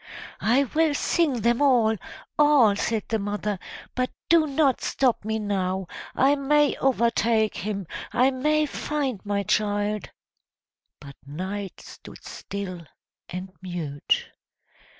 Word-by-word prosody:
"I 250 Hz, +5 st, +3 dB
will 305 Hz, +2 st, +1 dB
sing 285 Hz, -7 st, +1 dB
them 235 Hz, +3 st, +2 dB
all, 240 Hz, -6 st, +4 dB, 0.4 s
all!" 285 Hz, -9 st, +6 dB
said 220 Hz, +1 st, -1 dB
the 225 Hz, -, 0 dB
mother. 205 Hz, -1 st, -2 dB, 0.3 s
"But 255 Hz, 0 st, 0 dB, 0.2 s
do 330 Hz, -2 st, +5 dB
not 275 Hz, -2 st, +2 dB
stop 255 Hz, -6 st, +1 dB
me 220 Hz, +1 st, -1 dB
now 190 Hz, -3 st, -1 dB, 0.3 s
I 275 Hz, +2 st, +4 dB
may 290 Hz, +1 st, +3 dB
overtake 230 Hz, -4 st, +2 dB
him 200 Hz, +1 st, -3 dB, 0.3 s
I 255 Hz, +2 st, +3 dB
may 300 Hz, +4 st, +2 dB
find 280 Hz, -6 st, -3 dB
my 200 Hz, -1 st, -1 dB
child!" 205 Hz, +1 st, 0 dB, 0.9 s
But 140 Hz, -2 st, -12 dB
Night 190 Hz, +7 st, -5 dB
stood -, -, -13 dB
still 185 Hz, -5 st, -6 dB, 0.4 s
and 185 Hz, +2 st, -6 dB
mute. 170 Hz, -6 st, -2 dB
220 Hz, 120 wpm, -25 LUFS, 200-270 Hz, 0.9 s, all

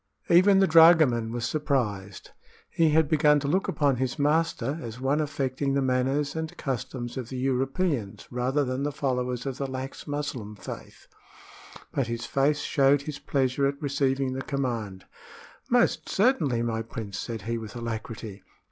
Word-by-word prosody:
Even 190 Hz, +3 st, +6 dB
the 195 Hz, -, +5 dB
dragoman 155 Hz, -9 st, +6 dB
was 120 Hz, 0 st, -3 dB
surprised. 105 Hz, -11 st, -2 dB, 0.4 s
He 165 Hz, -1 st, +3 dB
had 155 Hz, 0 st, +3 dB
begun 150 Hz, -1 st, +4 dB
to 140 Hz, -, -3 dB
look 185 Hz, +7 st, +1 dB
upon 140 Hz, -4 st, +1 dB
his 130 Hz, +2 st, -2 dB
master 150 Hz, -1 st, +1 dB
as 115 Hz, 0 st, -7 dB
one 135 Hz, +4 st, +1 dB
affecting 135 Hz, -2 st, -1 dB
the 140 Hz, -, +2 dB
manners 135 Hz, +3 st, 0 dB
and 160 Hz, 0 st, -4 dB
customs 125 Hz, -2 st, -4 dB
of 125 Hz, -3 st, -5 dB
the 130 Hz, -, -5 dB
Europeans 135 Hz, -, -1 dB
rather 130 Hz, +4 st, 0 dB
than 130 Hz, +1 st, -2 dB
the 145 Hz, +1 st, -1 dB
followers 125 Hz, -3 st, -2 dB
of 135 Hz, -1 st, -4 dB
the 140 Hz, -, -1 dB
lax 130 Hz, +1 st, -6 dB
Muslim 145 Hz, -8 st, -4 dB
faith; -, -, -10 dB, 0.9 s
but 135 Hz, -4 st, -1 dB
his 115 Hz, 0 st, -4 dB
face 145 Hz, +2 st, +1 dB
showed 140 Hz, 0 st, +3 dB
his 145 Hz, -1 st, -6 dB
pleasure 135 Hz, 0 st, +1 dB
at 140 Hz, 0 st, -3 dB
receiving 135 Hz, -2 st, 0 dB
the 135 Hz, -, -3 dB
command. 120 Hz, -9 st, -3 dB, 0.6 s
"Most 245 Hz, -1 st, +2 dB
certainly, 160 Hz, -, +2 dB
my 115 Hz, -1 st, -1 dB
prince," 110 Hz, -3 st, -6 dB
said 115 Hz, -2 st, -5 dB
he, 115 Hz, +1 st, -2 dB
with 110 Hz, -1 st, -9 dB
alacrity. 110 Hz, -3 st, -6 dB
135 Hz, 160 wpm, -27 LUFS, 120-145 Hz, 0.9 s, Even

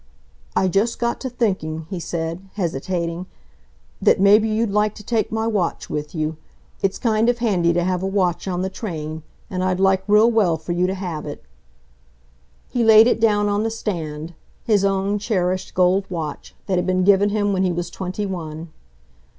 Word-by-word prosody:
"I 190 Hz, -, +3 dB
just 200 Hz, +5 st, +1 dB
got 235 Hz, 0 st, -1 dB
to 260 Hz, -, -3 dB
thinking," 185 Hz, -10 st, -2 dB
he 185 Hz, -, -3 dB
said, 170 Hz, +3 st, -4 dB
hesitating, 170 Hz, 0 st, -2 dB, 0.7 s
"that -, -, +4 dB
maybe 210 Hz, +3 st, +5 dB
you'd 215 Hz, 0 st, 0 dB
like 210 Hz, +1 st, +1 dB
to 210 Hz, -, -11 dB
take 225 Hz, 0 st, -1 dB
my 220 Hz, 0 st, -1 dB
watch 205 Hz, -7 st, -1 dB
with 150 Hz, +2 st, -4 dB
you. 155 Hz, 0 st, -2 dB, 0.4 s
It's 195 Hz, 0 st, 0 dB
kind 225 Hz, -1 st, +2 dB
of 245 Hz, -, +1 dB
handy 190 Hz, -8 st, +2 dB
to 175 Hz, +1 st, +1 dB
have 180 Hz, 0 st, 0 dB
a 190 Hz, -, -1 dB
watch 190 Hz, -2 st, 0 dB
on 180 Hz, -1 st, -1 dB
the 190 Hz, -, -1 dB
train. 160 Hz, -6 st, -5 dB, 0.3 s
And 185 Hz, -1 st, -3 dB
I'd 185 Hz, 0 st, 0 dB
like 190 Hz, 0 st, +3 dB
real 210 Hz, +3 st, +5 dB
well 195 Hz, -8 st, +2 dB
for 160 Hz, +2 st, -6 dB
you 175 Hz, +1 st, +1 dB
to 190 Hz, -, -2 dB
have 175 Hz, -6 st, -5 dB
it." 145 Hz, -, -7 dB, 1.2 s
He 245 Hz, -, 0 dB
laid 220 Hz, 0 st, +8 dB
it 240 Hz, -, +2 dB
down 210 Hz, -2 st, +3 dB
on 205 Hz, 0 st, +1 dB
the 225 Hz, -, 0 dB
stand, 165 Hz, -8 st, -4 dB, 0.3 s
his 210 Hz, -5 st, +2 dB
own 195 Hz, +1 st, +1 dB
cherished 185 Hz, -3 st, -1 dB
gold 185 Hz, +2 st, +2 dB
watch, 160 Hz, -5 st, -5 dB
that 185 Hz, -3 st, +1 dB
had 180 Hz, -, -2 dB
been 185 Hz, 0 st, +2 dB
given 200 Hz, +1 st, +5 dB
him 205 Hz, -1 st, 0 dB
when 190 Hz, -, 0 dB
he 185 Hz, -1 st, +2 dB
was 170 Hz, 0 st, -3 dB
twenty 190 Hz, +3 st, -4 dB
one. 165 Hz, -3 st, -6 dB
190 Hz, 190 wpm, -21 LUFS, 175-210 Hz, 1.2 s, laid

